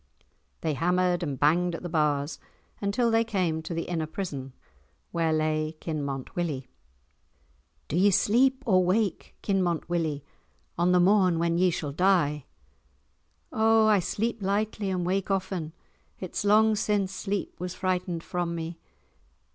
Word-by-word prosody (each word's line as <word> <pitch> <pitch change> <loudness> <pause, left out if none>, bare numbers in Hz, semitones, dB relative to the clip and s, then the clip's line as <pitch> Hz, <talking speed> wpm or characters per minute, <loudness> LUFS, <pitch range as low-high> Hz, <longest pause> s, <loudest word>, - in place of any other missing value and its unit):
They 160 -2 0
hammered 180 +3 +1
and 145 -6 -3
banged 170 +4 +2
at - - -8
the - - -3
bars 150 -3 0 0.4
until 225 +4 +1
they 225 0 +4
came 185 -8 -1
to 160 - -8
the 165 - -1
inner 165 -3 -3
prison, 145 -7 -5 0.6
where 165 -2 +1
lay 155 0 0
Kinmont 140 -5 -4
Willie. 155 -7 -2 1.2
"Do - - -3
ye 190 +4 +5
sleep 260 +7 +3
or 185 -5 +4
wake, 190 +1 0
Kinmont 180 -5 0
Willie, 160 -4 -1 0.5
on 175 +1 +2
the 180 - +5
morn 185 -2 +4
when 170 0 +1
ye 185 0 +4
shall 160 -4 -3
die?" 150 -4 +2 1.1
"O 220 0 +4
I 215 -2 +5
sleep 225 +5 -2
lightly 205 +1 -1
and 180 -2 -1
wake 190 +2 -1
often; 190 -4 -2 0.5
it's 185 +1 -4
long 215 +1 +4
since 205 -2 0
sleep 195 +1 -3
was 180 +1 -4
frightened 180 -3 -2
from 175 -1 -2
me. 165 0 -5
180 Hz, 145 wpm, -27 LUFS, 160-200 Hz, 1.2 s, ye